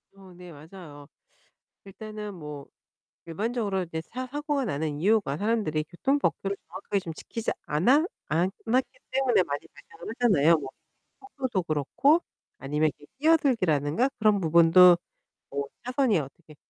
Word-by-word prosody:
어 190 -2 -15
네 180 0 -12
맞아요. 155 -2 -12 0.8
일단은 210 +1 -8
뭐 150 -5 -9 0.6
일반적으로 200 +2 -2
이제 165 -2 -5
차 255 +9 -6
사고가 290 +1 -2
나는 150 -6 -2
이유가 195 -4 +2
사람들이 200 -6 0
교통 270 - 0
법규를 200 -7 -1
정확하게 190 +3 -3
좀 165 -3 -7
지키지 230 +7 -4 0.2
않아 250 - +3 0.2
않았기 210 - -1
때문에 260 -6 +3
많이 145 -4 -5
발생을 165 +8 -11
하잖아요. 170 -9 +5
뭐 140 -3 -6 0.5
속도도 260 - -3
그렇고 170 - +2 0.4
아니면 150 +3 0
이렇게 145 - -17
끼어들기라든가 240 - +2
그런 215 -2 +3
부분도 170 +2 +7 0.5
뭐 140 0 -3 0.2
차선이 250 - +1
어떻게 150 +2 -10
185 Hz, 325 characters per minute, -27 LUFS, 155-235 Hz, 0.8 s, 부분도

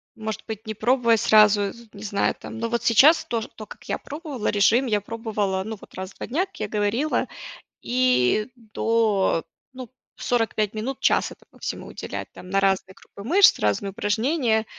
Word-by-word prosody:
может 220 -1 -5
быть, 220 0 -6
не 220 - -4
пробуя 235 +1 +2
сразу, 210 -2 +4
з 235 -1 -15
не 200 0 -10
знаю 200 -2 0
там - - -8
но 230 0 -2
вот 235 0 -1
сейчас 285 +8 +6
тож 230 -2 -2
то, 215 - -8
как 245 - -13
я - - 0
пробовала, 290 -6 -6
режим 215 +5 +3
я 210 -2 +1
пробовала, 210 -3 -2
ну, 220 0 -5
вот - - -16
раз 190 +1 -6
в - - -27
2 - - -6
дня, 325 +10 0
как 390 - -18
я - - -1
говорила, 215 +8 0 0.5
и 245 - +2
до, 220 -5 0 0.3
ну, 255 -2 -9 0.3
45 225 -3 0
минут, 240 +5 -4
час - - +2
этому - - -17
всему - - -5
уделять - - -6
там 180 - -12
на 195 - +2
разные 190 -1 +1
группы 200 - -13
мышц, 370 - +5
разные 105 - 0
упражнения. 220 - 0
220 Hz, 185 wpm, -24 LUFS, 205-245 Hz, 0.5 s, сейчас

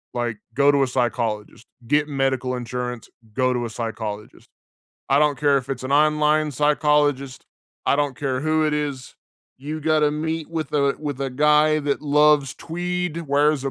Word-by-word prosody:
Like, 120 -2 -2 0.2
go 140 +1 +5
to 140 -1 +2
a 135 - +2
psychologist, 115 -3 -2 0.2
get 150 +3 +2
medical 135 -2 -1
insurance, 125 0 -5 0.3
go 130 0 +1
to 120 -1 -2
a - - -5
psychologist. 110 -2 -6 0.6
I 140 +2 +4
don't 145 -3 +2
care 145 -2 +3
if 130 +1 -9
it's 130 -1 -4
an 135 - -2
online 150 0 +3
psychologist, 145 -1 +1 0.4
I - - +4
don't 145 -3 -1
care 130 -2 -2
who 155 0 +1
it 150 - 0
is, 140 -3 -4 0.4
you 155 +3 -5
gotta 155 -1 +2
meet 160 +1 -3
with 160 -3 -4
a 140 -2 +1
with 145 -3 -5
a 135 -1 -2
guy 150 +3 +3
that 145 +1 -2
loves 150 -2 +3
tweed, 175 0 -3
wears 145 0 +2
a 135 - -1
145 Hz, 170 wpm, -22 LUFS, 130-150 Hz, 0.6 s, go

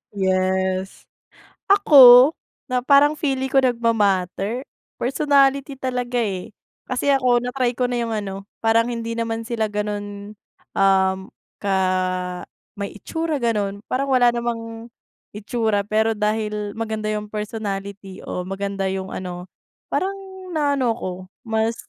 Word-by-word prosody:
Yes, 190 0 0 0.6
ako 275 -10 +8 0.4
na 250 - +2
parang 285 +4 +4
feeling 265 -4 -1
ko 270 - +3
nagma-matter, 225 -3 +1 0.3
personality 275 +1 +2
talaga, 250 -2 -4
eh. 195 -1 -4 0.3
Kasi 255 +2 0
ako 250 -3 +3
na-try 250 0 -1
ko 250 +1 -1
na 245 - -1
yung 230 -1 -2
ano, 195 -2 -5 0.2
parang 225 +1 +3
hindi 230 -1 -4
naman 230 0 -2
sila 225 -1 -1
ganun, 205 0 -5 0.4
um, 190 -1 +3 0.4
ka 200 -1 -1 1.0
may 200 0 -5
itsura, 315 - -3
ganon. 205 -3 -1
Parang 270 +2 0
wala 245 -1 +5
namang 230 -1 -4 0.5
itsura, 215 0 -1
pero 220 +2 +1
dahil 210 -1 -1
maganda 220 -1 -2
yung 210 0 -3
personality 200 -2 -5
o 180 - -5
maganda 195 0 -3
yung 190 0 -3
ano 180 -1 -6 0.5
parang 385 +1 0 0.4
na 295 -2 +1
ano 245 -3 +1
ako 185 - -5 0.3
mas 225 -1 0
225 Hz, 125 wpm, -22 LUFS, 200-250 Hz, 1.0 s, ako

